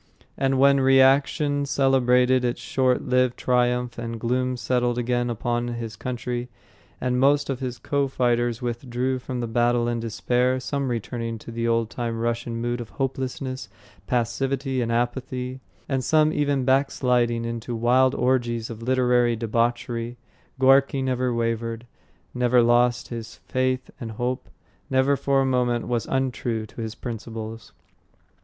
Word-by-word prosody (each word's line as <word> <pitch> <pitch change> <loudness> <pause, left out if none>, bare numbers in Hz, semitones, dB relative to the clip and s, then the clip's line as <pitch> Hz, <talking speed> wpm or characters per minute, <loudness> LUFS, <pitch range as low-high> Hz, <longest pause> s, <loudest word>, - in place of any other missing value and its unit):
And 135 -1 +1
when 140 +1 +5
reaction 135 +2 +4
celebrated 130 -2 +3
its 120 -1 -1
short 130 -1 +1
lived 125 -1 +1
triumph 125 -1 +1
and 115 -1 -5
gloom 125 +2 0
settled 120 -1 0
again 120 0 0
upon 120 +1 -1
his 115 -2 -5
country 125 -1 -4 0.5
and 125 0 0
most 140 +1 +3
of 130 - -3
his 125 -3 -4
co 140 -1 0
fighters 120 -2 0
withdrew 125 +2 -2
from 125 0 -4
the 120 - -2
battle 120 +1 +2
in 120 0 -1
despair, 120 +4 0
some 140 +1 -2
returning 115 0 -3
to 110 - -10
the 115 0 -2
old 115 -1 +1
time 115 -2 -3
Russian 115 0 -2
mood 120 +1 -2
of 115 - -8
hopelessness, 130 +3 -4 0.4
passivity 130 +2 -1
and 115 -1 -1
apathy, 125 +2 -2 0.3
and 135 -2 -1
some 155 +3 +3
even 145 -3 +1
backsliding 125 -3 +2
into 115 0 -4
wild 125 +3 +3
orgies 120 -2 0
of 115 0 -8
literary 125 -1 +2
debauchery, 120 +1 -1 0.4
Gorky 135 +1 +4
never 130 -1 0
wavered, 115 0 -2 0.5
never 125 0 +3
lost 120 +1 +3
his 115 -2 -7
faith 130 0 -1
and 115 -2 -6
hope, 125 +3 -3 0.4
never 130 +1 +3
for 135 0 +1
a - - +1
moment 125 -3 +1
was 120 -2 -1
untrue 125 -4 -1
to 110 - -9
his 110 -1 -5
principles. 115 -1 -7
125 Hz, 145 wpm, -24 LUFS, 120-130 Hz, 0.5 s, when